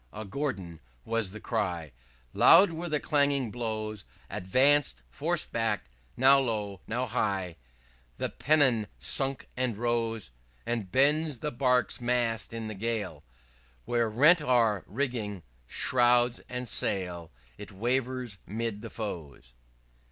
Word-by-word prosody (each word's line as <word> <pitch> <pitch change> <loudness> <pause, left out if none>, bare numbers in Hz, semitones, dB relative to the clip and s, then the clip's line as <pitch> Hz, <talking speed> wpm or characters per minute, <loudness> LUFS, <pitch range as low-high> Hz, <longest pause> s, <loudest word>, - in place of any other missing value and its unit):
a 110 +1 -7
Gordon!_ 95 - -4 0.3
was 115 -3 0
the 110 +3 -8
cry; 85 -6 -2 0.4
_Loud 180 +3 +7
were 170 +2 -5
_the 150 -1 +1
clanging 140 -5 +1
blows: 110 -3 -4 0.3
_Advanced 105 - +2
forced - - -1
back - - -1 0.3
now 135 +2 +6
low, 105 -6 -2
now 120 +3 -1
high, 95 -7 -1 0.6
_The - - -4
pennon 130 -8 +3
sunk 135 -1 0
and 125 -4 -1
rose; 115 - -1 0.3
As 115 -3 -2
bends 145 - +2
the 150 - -2
bark's 125 -1 +1
mast 120 -2 0
in 115 -1 -5
the 110 - -5
gale 110 +1 -3 0.6
When 120 -1 0
rent 140 +10 +5
are 115 -8 +2
rigging, 110 - -3 0.2
shrouds 120 - +3
and 125 0 -4
sail, 90 -5 -2 0.3
It - - -9
wavered 125 +1 -1
'mid 110 0 -3
the - - -7
foes." 70 - -7
115 Hz, 125 wpm, -29 LUFS, 105-130 Hz, 0.6 s, Loud